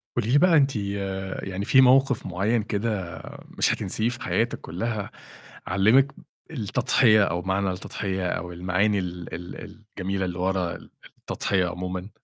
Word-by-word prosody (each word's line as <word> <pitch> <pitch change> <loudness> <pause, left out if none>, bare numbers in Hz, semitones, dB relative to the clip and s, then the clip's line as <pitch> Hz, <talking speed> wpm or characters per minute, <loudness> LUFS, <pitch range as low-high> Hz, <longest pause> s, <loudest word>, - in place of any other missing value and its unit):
قولي 120 -1 0
لي 140 - +6
بقى 170 +1 +5
أنتِ 135 -2 +3
يعني 95 -1 -3
فيه 130 - +6
موقف 135 0 +4
معين 100 +5 0
كده 105 -4 -3 0.4
مش - - +3
هتنسيه 110 +4 -1
في 120 0 -6
حياتِك 115 +1 -1
كُلّها، 110 -3 -4 0.6
علِّمِك 110 +9 +4 0.4
التضحية 115 -3 +3
أو 90 -2 -1
معنى 95 +1 0
التضحية 95 0 -3
أو 90 0 -3
المعاني 95 +4 +1
ال 90 -2 -6
ال 90 +1 -7 0.4
الجميلة 95 0 -1
اللي 90 -1 -4
ورا 90 -1 0 0.5
التضحية 95 -3 0
عمومًا؟ 90 +2 -5
100 Hz, 135 wpm, -25 LUFS, 90-115 Hz, 0.6 s, لي